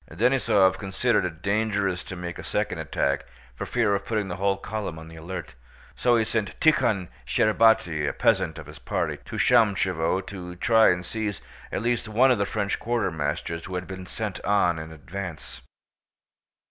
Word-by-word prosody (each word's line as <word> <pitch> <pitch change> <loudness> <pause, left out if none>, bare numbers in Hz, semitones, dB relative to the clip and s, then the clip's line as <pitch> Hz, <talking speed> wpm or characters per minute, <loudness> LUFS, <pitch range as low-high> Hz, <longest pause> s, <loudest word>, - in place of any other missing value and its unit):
Denísov 110 -1 +3
considered 100 +2 +1
it 85 -1 -6
dangerous 100 -2 0
to 90 - -7
make 90 -1 -6
a - - -7
second 105 -4 -2
attack 70 -2 0 0.3
for - - -5
fear 115 -4 +2
of 100 0 0
putting 105 -2 -2
the 90 - -4
whole 100 0 +1
column 100 -4 -5
on 80 0 -10
the 80 - -12
alert, 85 +1 -7 0.4
so 120 -1 +3
he 110 - +2
sent 110 -2 -2
Tíkhon 120 - +3 0.2
Shcherbáty, 105 -9 +3
a - - -1
peasant 90 -7 +1
of 80 - -8
his 75 +2 -12
party, - - -2
to - - -7
Shámshevo 95 -4 +2
to 90 -3 -7
try 110 +5 +5
and 90 0 0
seize 105 -2 -3 0.3
at - - -2
least 120 -1 0
one 125 +5 +4
of 120 - +2
the 100 - +1
French 105 -2 -1
quartermasters 85 -7 -2
who 95 - -5
had 90 0 -3
been 95 -1 -8
sent 105 0 -5
on 90 -4 +2
in 80 0 -7
advance. 80 -1 -7
95 Hz, 175 wpm, -26 LUFS, 85-110 Hz, 0.4 s, try